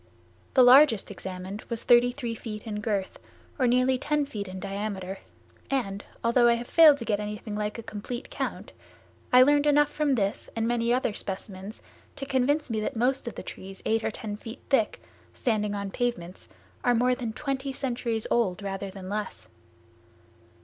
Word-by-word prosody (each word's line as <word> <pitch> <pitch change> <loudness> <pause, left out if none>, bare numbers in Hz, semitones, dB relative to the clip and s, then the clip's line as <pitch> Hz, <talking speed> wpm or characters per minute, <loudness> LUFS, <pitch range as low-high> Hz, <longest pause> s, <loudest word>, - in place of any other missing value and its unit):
The 260 - +8
largest 250 -5 +6
examined 190 +1 -6
was 235 -1 -3
thirty 245 0 +5
three 245 -3 -4
feet 215 -2 -7
in 210 -2 -4
girth, 205 -4 -2 0.4
or 255 - +3
nearly 255 +1 +3
ten 295 +1 0
feet 210 -8 -6
in 185 0 -7
diameter 195 -1 -4 0.5
and, 205 -8 -2 0.2
although 240 +1 +4
I 235 - +5
have 235 +1 -5
failed 315 -4 +7
to 230 - -6
get 210 -2 0
anything 210 0 -5
like 210 +1 -2
a 230 - -7
complete 235 +4 -6
count, - - -4 0.6
I 250 0 +8
learned 290 +2 +4
enough 295 0 +4
from 295 -3 +1
this 200 -3 -2
and 225 0 0
many 235 0 +1
other 245 -3 +1
specimens 195 0 -6 0.3
to 275 - -5
convince 280 +3 +1
me 225 -3 -2
that 215 - -3
most 250 +3 0
of 235 - -5
the - - -7
trees 195 0 -9
eight 225 0 +1
or - - +1
ten 210 -1 -6
feet 225 +3 -9
thick, 230 -6 +2 0.4
standing 210 -3 0
on 200 -1 -4
pavements, 225 -8 -3 0.3
are 245 -2 +3
more 250 +2 +3
than 245 -3 -3
twenty 270 +3 -3
centuries 240 -4 -2
old 200 -5 +1
rather 195 0 -4
than 190 -1 -9
less. 210 +2 -5
230 Hz, 175 wpm, -27 LUFS, 205-255 Hz, 0.6 s, The